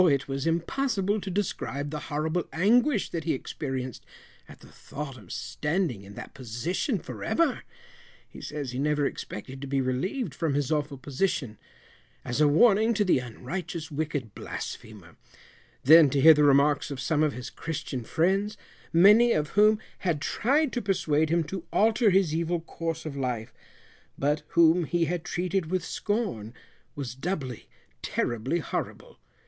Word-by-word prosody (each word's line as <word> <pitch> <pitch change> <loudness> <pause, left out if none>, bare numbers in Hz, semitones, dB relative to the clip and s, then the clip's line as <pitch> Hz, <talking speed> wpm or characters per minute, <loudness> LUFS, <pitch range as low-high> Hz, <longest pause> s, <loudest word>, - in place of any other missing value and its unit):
it 140 -2 +1
was 135 +2 -2
impossible 200 +4 0
to 195 - -5
describe 145 -7 -3
the 150 - -3
horrible 155 +3 -1
anguish 230 - +2
that 165 -2 -3
he 165 - 0
experienced 130 -2 -5 0.5
at - - -13
the - - -14
thought 140 -2 -7
of 105 -8 -13
standing 150 - -2
in 100 +1 -12
that - - -9
position 145 - -2
for - - -8
ever 325 -5 +1 0.7
(he - - -12
says 145 -4 -5
he 125 - -4
never 150 0 +1
expected 130 +1 -6
to 140 - -5
be 135 0 0
relieved 135 - -2
from 160 -5 -1
his 145 +1 0
awful 150 -2 -1
position), 130 - -2 0.7
as 125 +4 -1
a 150 - +6
warning 220 +8 +4
to 205 - +2
the 180 - +3
unrighteous 155 - -6
wicked 145 -6 -3
blasphemer; 105 -8 -8 0.7
then 155 +1 +8
to 140 - 0
hear 160 +4 +9
the 150 0 +3
remarks 145 +1 +4
of 140 -3 -5
some 145 +4 0
of 155 -2 +2
his 125 0 -7
Christian 140 -6 -5
friends, 195 - 0 0.3
many 210 +8 +6
of 150 -1 0
whom 210 +1 +5 0.2
had 170 -5 0
tried 275 - +1
to 245 - -1
persuade 160 -6 +1
him 170 +1 +2
to 170 +3 -6
alter 220 +1 +3
his 185 -5 +3
evil 170 +1 0
course 165 0 -5
of 150 -3 -5
life, 125 -5 -3 0.6
but 145 +2 +1
whom 170 +1 +5
he 170 +1 +1
had 170 +1 -2
treated 180 -1 -1
with 185 -1 -1
scorn, 195 - -3 0.4
was 135 -5 -5
doubly 135 - -4 0.3
terribly 120 +6 -1
horrible. 165 - -5
155 Hz, 160 wpm, -27 LUFS, 135-185 Hz, 0.7 s, hear